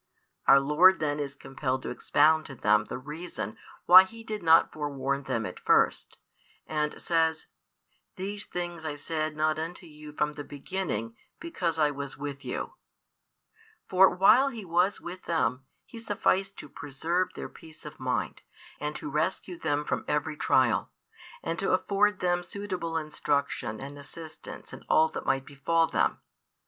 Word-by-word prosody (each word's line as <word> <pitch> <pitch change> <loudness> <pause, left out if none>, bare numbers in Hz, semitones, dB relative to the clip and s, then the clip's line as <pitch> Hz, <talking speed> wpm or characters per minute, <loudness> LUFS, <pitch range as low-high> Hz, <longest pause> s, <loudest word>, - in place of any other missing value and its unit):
our 140 - +8
Lord 160 +7 +5
then 150 -1 -1
is 140 -1 -4
compelled 130 -1 -3
to - - -4
expound 155 +5 +3
to 135 - -9
them 105 -2 +3
the - - -5
reason 150 - -6 0.3
why 185 +2 +10
He 225 +4 -11
did 215 -2 -5
not 165 -1 +5
forewarn 140 -2 -2
them 115 -3 -1
at - - -7
first; - - +2 0.5
and 150 -1 -2
says: 160 -1 +1 0.7
These 200 +2 -5
things 175 -2 -5
I 155 -2 -3
said 155 +1 -3
not 155 0 +1
unto 175 +3 -5
you 150 -1 -11
from 150 0 -1
the 145 - -7
beginning, 140 - -4 0.2
because 175 - -2
I 150 -2 +3
was 140 -1 -6
with 145 0 -6
you; 125 - -4 1.1
for 190 +1 +6
while 195 +9 +5
He 225 -6 -8
was 180 +4 +2
with 180 +2 -9
them, 135 -6 0 0.2
He 230 - -10
sufficed 195 -3 0
to - - -8
preserve 160 +6 -2
their - - -5
peace 160 -2 -13
of 150 - -9
mind, 125 -9 -2 0.4
and 150 0 -3
to - - -5
rescue 165 +4 -2
them 150 -1 -1
from - - -2
every 150 +1 -1
trial, 130 -5 +2 0.5
and 165 0 -3
to 195 - +1
afford 205 +2 +2
them 175 -1 +1
suitable 180 -3 -4
instruction 140 -7 -2
and 140 +2 -8
assistance 160 +2 -10
in - - -10
all 160 0 +5
that - - -7
might 135 0 +1
befall 165 +4 +1
them. - - 0
155 Hz, 160 wpm, -28 LUFS, 145-180 Hz, 1.1 s, why